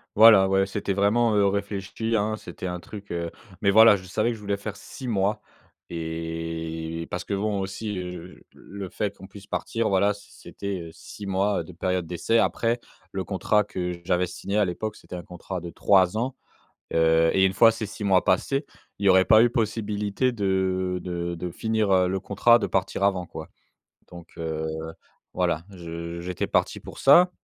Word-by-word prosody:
Voilà, 105 -3 +8
ouais 95 0 +3
c'était 100 0 -2
vraiment, 105 +3 +2
heu, 100 -1 +4
réfléchi, 100 +3 -2
hein, 110 0 +1
c'était 90 -3 -9
un 90 -1 -3
truc 100 +2 -10
heu, 85 -1 -2 0.3
mais 100 - +3
voilà, 110 +1 +8
je 95 - -7
savais 110 +5 0
que - - -4
je 110 - -13
voulais 100 -1 -1
faire 100 +1 -6
6 125 +6 -9
mois 100 -2 +1 0.5
et 80 0 -4
parce - - -3
que - - -4
bon 100 0 -1
aussi, 100 +2 -4
heu, 90 0 -7
j - - -21
le 100 -1 -8
fait 100 +1 -3
qu'on 95 - -12
puisse 100 0 -13
partir, 115 -1 -1
voilà, 100 +2 +3
c 100 - -15
c'était, 100 -2 -6
heu, - - -9
6 100 +4 -10
mois 95 -1 +1
de 90 - -12
période 90 0 -1
d'essai, 90 +7 +1
après 115 +1 +1 0.3
le 95 -1 -3
contrat 105 +2 +1
que 90 -3 -4
j'avais 90 +1 +1
signé 100 +4 -4
à 105 - +4
l'époque, 100 +4 -4
c'était - - -10
un 90 - -6
contrat 90 +2 -6
de 85 - -6
3 95 +3 +3
ans. 125 +3 -2 0.6
Heu, 80 0 +4
et 95 - +4
1 95 - +3
fois 115 +3 +6
ces 110 -1 -4
6 105 +1 -7
mois 95 -2 +3
passés, 135 - +1 0.4
il 100 - 0
y - - +7
aurait 95 0 +6
pas 110 +2 +7
eu 120 - +4
possibilité 105 0 0
de 95 -4 0
de 85 -1 -3
de 90 +1 -5
finir, 110 +2 0
heu, 90 -1 +4
le 95 +1 -1
contrat, 110 +4 +4
de - - 0
partir - - -1
avant 95 -3 +1
quoi - - -8 0.6
donc 85 -1 -11
heu, 80 -1 -3 0.7
voilà. 85 -3 0
Je 85 -1 -7
j'étais 90 +1 -3
parti - - 0
pour - - -11
ça 175 +6 +7
95 Hz, 195 wpm, -25 LUFS, 90-105 Hz, 0.7 s, Voilà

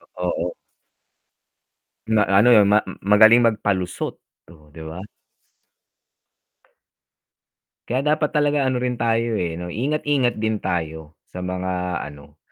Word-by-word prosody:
Uh, 90 -1 -2
oo. 90 +1 -2 1.6
Na 110 -1 +3
ano 100 +5 +4
'yon 110 -4 +6
ma 105 +2 +4 0.2
magaling 110 +4 +6
magpalusot, 100 -5 -1 0.3
oh, 75 -3 -19
'di 80 - -11
ba? 80 +3 -8 2.9
Kaya 130 +2 0
dapat 155 -1 0
talaga 145 -1 +1
ano 130 -1 0
rin 125 0 -1
tayo, 115 0 0
eh, 85 -2 -3
'no 90 0 -6
ingat-ingat 140 0 0
din 110 -1 -2
tayo 80 -3 -4
sa 90 - -9
mga 90 -1 -3
ano, 75 0 -13
100 Hz, 120 wpm, -21 LUFS, 90-120 Hz, 2.9 s, yon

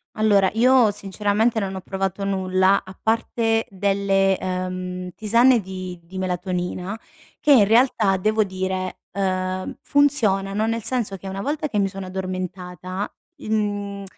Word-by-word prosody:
Allora, 205 -3 +4
io 245 0 +5
sinceramente 205 +3 0
non 195 -1 -3
ho 190 - -5
provato 195 +1 -3
nulla, 190 0 +2
a 185 0 -12
parte 225 0 0
delle, 195 0 +1
uhm, 185 0 -3
tisane 235 +3 +4
di 185 -2 -7
di 185 +3 -10
melatonina 180 +1 -3 0.4
che 295 - +3
in 225 -7 +7
realtà 220 -4 +3
devo 215 +3 +2
dire, 185 -1 -3
uhm, 185 -1 -2
funzionano 215 -8 +2
nel 230 0 -1
senso 225 -5 -1
che 195 - -10
una 195 +1 -4
volta 300 +5 -2
che 215 - -3
mi 195 -1 +3
sono 195 -1 -7
addormentata, 185 0 -5 0.3
mhmm, 205 -4 -2
195 Hz, 135 wpm, -22 LUFS, 185-215 Hz, 0.4 s, in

